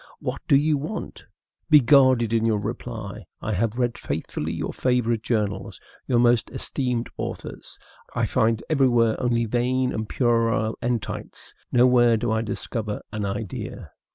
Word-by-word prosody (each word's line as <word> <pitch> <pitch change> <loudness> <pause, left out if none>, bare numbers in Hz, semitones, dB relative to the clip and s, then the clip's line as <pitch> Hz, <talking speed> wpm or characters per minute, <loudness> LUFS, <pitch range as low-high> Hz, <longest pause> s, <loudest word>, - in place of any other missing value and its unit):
what - - -4
do - - +5
you 145 +1 +3
want? 155 +10 -6 0.4
Be 150 -2 +8
guarded 130 -3 +4
in 115 -1 +2
your 115 -2 +2
reply. 110 -1 -5 0.2
I 110 - -3
have 110 +4 0
read 120 -2 0
faithfully - - -3
your - - -3
favorite 120 -3 +1
journals, 105 -4 -2 0.3
your 125 - +2
most 120 -1 +3
esteemed 125 -4 -2
authors. - - -6 0.4
I - - +1
find 115 0 +1
everywhere 120 -7 +3
only 120 -2 +1
vain 125 +3 0
and 110 0 -4
puerile 115 -2 +1
entites; 120 -3 -3 0.2
nowhere 120 -1 +5
do 115 +1 -1
I 110 0 +1
discover 110 -1 -3
an 105 -2 -3
idea. 100 0 -5
120 Hz, 145 wpm, -24 LUFS, 110-125 Hz, 0.4 s, Be